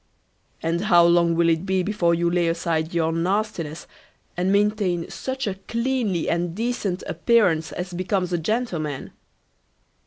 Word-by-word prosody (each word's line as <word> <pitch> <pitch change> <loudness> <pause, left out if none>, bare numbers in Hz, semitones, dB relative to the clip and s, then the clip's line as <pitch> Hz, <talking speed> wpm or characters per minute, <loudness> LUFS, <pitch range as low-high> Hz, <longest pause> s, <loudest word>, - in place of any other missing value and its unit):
"And 165 +2 0
how 175 -4 +6
long 170 -1 +4
will 170 0 +3
it 165 0 +2
be 190 -1 0
before 175 -4 +1
you 170 +1 0
lay 170 0 +1
aside 165 -1 -1
your 165 -1 +1
nastiness, 170 -2 -2 0.5
and 180 +2 0
maintain 200 -4 +1
such 265 0 -4
a 200 - -1
cleanly 230 -7 -1
and 170 0 -1
decent 215 -5 -2
appearance 170 -3 +2
as 180 0 -5
becomes 185 0 -1
a 175 - +1
gentleman?" 165 - -2
175 Hz, 145 wpm, -23 LUFS, 170-205 Hz, 0.5 s, how